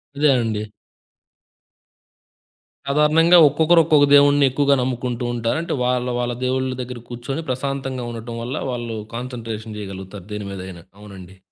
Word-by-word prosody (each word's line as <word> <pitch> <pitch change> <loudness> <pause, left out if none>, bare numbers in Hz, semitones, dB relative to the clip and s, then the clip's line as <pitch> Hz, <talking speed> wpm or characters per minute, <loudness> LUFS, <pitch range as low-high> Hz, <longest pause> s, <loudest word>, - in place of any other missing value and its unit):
అదే 150 +1 +3
అండి. 110 -2 -2 2.3
సాధారణంగా 155 +4 +5
ఒక్కొక్కరు 160 +4 +4
ఒక్కొక్క 150 -2 +4
దేవుడ్ని 145 0 +6
ఎక్కువగా 140 +1 +2
నమ్ముకుంటూ 125 -1 -3
ఉంటారు. 115 +3 -1
అంటే, 170 - -3
వాళ్ళ 125 0 0
వాళ్ళ 120 0 -1
దేవుళ్ళ 130 +1 0
దగ్గర 125 -1 -7
కూర్చొని, 125 +6 -5
ప్రశాంతంగా 130 -1 -3
ఉండటం 115 0 -7
వల్ల, 125 +4 -4 0.2
వాళ్ళు 120 -2 -4 0.2
కాన్సంట్రేషన్ 115 -3 -6
చేయగలుగుతారు, 95 -1 -8
దేని 105 -1 -5
మీదయినా. 95 -3 -8 0.2
అవునండి. 95 -2 -12
125 Hz, 125 wpm, -21 LUFS, 110-140 Hz, 2.3 s, దేవుడ్ని